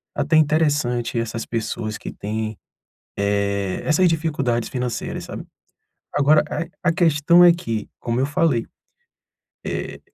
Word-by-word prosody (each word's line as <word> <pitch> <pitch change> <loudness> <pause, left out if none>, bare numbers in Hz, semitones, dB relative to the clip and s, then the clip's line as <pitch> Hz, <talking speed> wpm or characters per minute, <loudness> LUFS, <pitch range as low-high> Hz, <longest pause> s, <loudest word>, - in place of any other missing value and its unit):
até 150 +2 +2
interessante 145 -7 +1
essas 115 0 -3
pessoas 110 -1 -3
que - - -7
têm, 110 +1 -4 0.6
eh, 100 -1 0
essas 170 +4 +3
dificuldades 150 -8 0
financeiras, 125 -2 -3
sabe. - - -7 0.7
Agora 145 +2 +4
a 170 +3 -2
a - - +4
questão 170 0 +4
é 175 - +8
que, 115 -10 -4
como 120 +1 -2
eu 130 - +2
falei, 145 -4 +1 1.0
eh - - -4
135 Hz, 125 wpm, -22 LUFS, 115-155 Hz, 1.0 s, é